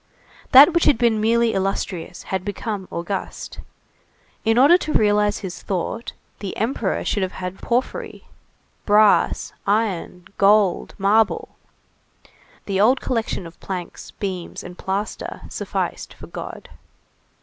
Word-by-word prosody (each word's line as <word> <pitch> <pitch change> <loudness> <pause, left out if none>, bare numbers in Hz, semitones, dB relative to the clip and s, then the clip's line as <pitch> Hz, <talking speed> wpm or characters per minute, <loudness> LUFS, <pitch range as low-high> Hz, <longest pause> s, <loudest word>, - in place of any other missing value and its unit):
That 285 +6 +9
which 340 - +2
had 295 - +5
been 225 -2 +2
merely 230 +1 +3
illustrious, 190 -2 -3
had 190 -1 0
become 205 -1 -4
august. 180 +3 -5 0.8
In 225 0 +2
order 285 +7 +7
to 310 - -3
realize 210 -1 +3
his 180 - -7
thought, 195 +5 -3 0.3
the 195 -2 -5
Emperor 225 -3 -1
should 205 - 0
have 185 -1 -2
had 180 +1 -6
porphyry, 245 +2 -2 0.6
brass, 210 0 +3
iron, 195 -4 -1
gold, 200 -2 +3
marble; 210 +2 +2 1.2
the 195 -1 0
old 250 +5 +4
collection 225 -6 -2
of 165 0 -12
planks, 180 -3 -6
beams 185 -4 -5
and 180 - -9
plaster 195 +4 -4
sufficed - - -4
for - - -11
God. - - -8
205 Hz, 125 wpm, -22 LUFS, 190-225 Hz, 1.2 s, That